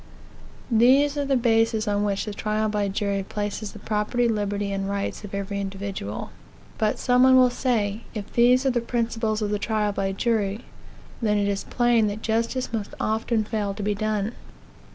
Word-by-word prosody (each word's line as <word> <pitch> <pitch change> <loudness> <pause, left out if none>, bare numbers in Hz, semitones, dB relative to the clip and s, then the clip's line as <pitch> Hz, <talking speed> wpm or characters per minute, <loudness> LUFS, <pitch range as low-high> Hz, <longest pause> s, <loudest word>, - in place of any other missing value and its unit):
These 265 +6 +5
are 285 -1 -1
the 275 -1 +2
bases 225 -2 +2
on 205 0 +1
which 200 -1 -1
the 210 - -5
trial 215 +1 -1
by 210 -1 0
jury 200 0 -1
places 205 +1 -4
the - - -10
property, 215 +4 0
liberty, 205 -2 -1
and 195 0 -2
rights 200 +1 -3
of 200 -1 -6
every 200 0 -3
individual. 195 - -5 0.5
But 215 -1 +1
some 250 0 +3
one 260 0 +7
will 255 -1 +6
say, 220 -5 0
if 205 -2 -6
these 250 +2 +4
are 265 - +4
the 240 -1 0
principles 230 -2 -1
of 205 - -1
the 210 - 0
trial 210 -1 0
by 195 -1 -1
jury, 210 -1 0 0.6
then 210 -2 +2
it 205 0 +1
is 200 -1 -2
plain 240 -3 +2
that 210 +2 -4
justice 230 +3 -1
must 215 -3 -4
often 220 +1 0
fail 210 -2 -2
to 205 - -5
be 210 +1 +1
done. 215 0 -1
215 Hz, 185 wpm, -24 LUFS, 200-235 Hz, 0.6 s, one